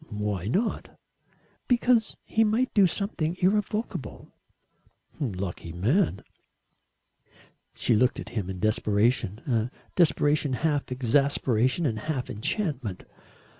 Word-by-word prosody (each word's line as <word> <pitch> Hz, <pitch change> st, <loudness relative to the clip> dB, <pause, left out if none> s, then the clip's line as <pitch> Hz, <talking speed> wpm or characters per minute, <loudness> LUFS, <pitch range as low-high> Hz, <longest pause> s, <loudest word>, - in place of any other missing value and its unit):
"Why 105 Hz, -3 st, -3 dB
not?" 205 Hz, -, -1 dB, 0.7 s
"Because 240 Hz, -2 st, +2 dB
he 225 Hz, -, +2 dB
might 225 Hz, +4 st, +1 dB
do 200 Hz, -3 st, +6 dB
something 175 Hz, -3 st, -2 dB
irrevocable." 210 Hz, +4 st, -1 dB, 0.9 s
"Lucky 95 Hz, -, -4 dB
man." 115 Hz, -, +1 dB, 1.5 s
She 115 Hz, -, +2 dB
looked 125 Hz, +4 st, +2 dB
at -, -, -7 dB
him 105 Hz, -6 st, -3 dB
in 95 Hz, -1 st, -5 dB
desperation 110 Hz, 0 st, +1 dB
a 115 Hz, -3 st, 0 dB, 0.3 s
desperation 150 Hz, -4 st, +3 dB
half 145 Hz, 0 st, -1 dB
exasperation 130 Hz, +2 st, +2 dB
and 110 Hz, -6 st, 0 dB
half 135 Hz, +1 st, -3 dB
enchantment. 125 Hz, -, -3 dB
130 Hz, 100 wpm, -27 LUFS, 110-180 Hz, 1.5 s, do